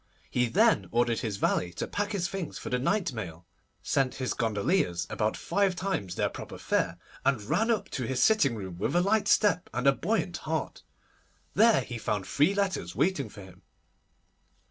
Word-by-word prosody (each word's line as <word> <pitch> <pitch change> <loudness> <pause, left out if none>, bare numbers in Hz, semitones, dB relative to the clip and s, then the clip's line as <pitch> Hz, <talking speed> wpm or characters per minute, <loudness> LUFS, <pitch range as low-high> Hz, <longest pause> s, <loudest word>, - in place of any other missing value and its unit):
He 125 0 +2
then 105 -4 +3
ordered 120 0 +1
his 110 -5 -3
valet 90 -2 0
to - - -3
pack 205 +1 -2
his 180 -4 0
things 190 -2 -5
for - - -7
the 125 - +1
night 185 +3 0
mail, 90 -7 -7 0.4
sent 135 -2 +1
his 130 -1 -2
gondoliers 105 - 0
about 110 0 0
five 200 -2 +1
times 175 - -2
their - - +1
proper - - -8
fare, - - 0 0.3
and 135 -3 +2
ran 225 - +1
up 225 -3 +1
to 130 - -3
his 130 -1 -1
sitting 215 - +4
room 95 -5 -7
with 105 - -1
a 175 - +5
light 205 +1 +2
step 205 -3 +3
and 125 +2 -1
a 140 - +7
buoyant 180 +2 -1
heart. 160 -1 -3 0.7
There 225 +2 +5
he 120 -3 -6
found 105 -3 -2
three 150 - +2
letters 200 -2 -1
waiting 175 -5 +1
for 100 - -11
him. 95 -1 -15
135 Hz, 185 wpm, -28 LUFS, -, 0.7 s, a